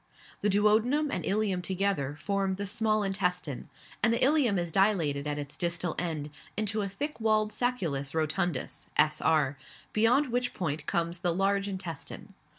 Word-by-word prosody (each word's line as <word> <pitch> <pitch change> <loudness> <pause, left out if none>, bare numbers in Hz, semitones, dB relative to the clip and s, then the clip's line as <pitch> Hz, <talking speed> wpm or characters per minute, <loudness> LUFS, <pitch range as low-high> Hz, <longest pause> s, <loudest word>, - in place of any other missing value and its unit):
The 205 - +2
duodenum 220 +9 +3
and - - -2
ileum 200 -2 +1
together 180 -7 -1
form 195 0 0
the 200 +1 -3
small 215 +1 +1
intestine; 180 -7 -2 0.3
and 225 - +4
the 230 - +2
ileum 260 -5 +3
is 175 -1 -1
dilated 165 -7 +2
at 145 0 -2
its 145 0 -6
distal 175 -1 -1
end 155 -4 -3 0.3
into 215 0 0
a 200 - -2
thick 290 +10 -4
walled 215 -1 +2
sacculus 170 - -1
rotundus 155 -1 -1
(s.r.), 150 -2 +3 0.4
beyond 245 +6 +3
which 245 +1 -1
point 155 -4 -3
comes 170 -1 -1
the 175 -1 +1
large 195 +1 +1
intestine. 190 0 -6
195 Hz, 155 wpm, -29 LUFS, 160-215 Hz, 0.4 s, and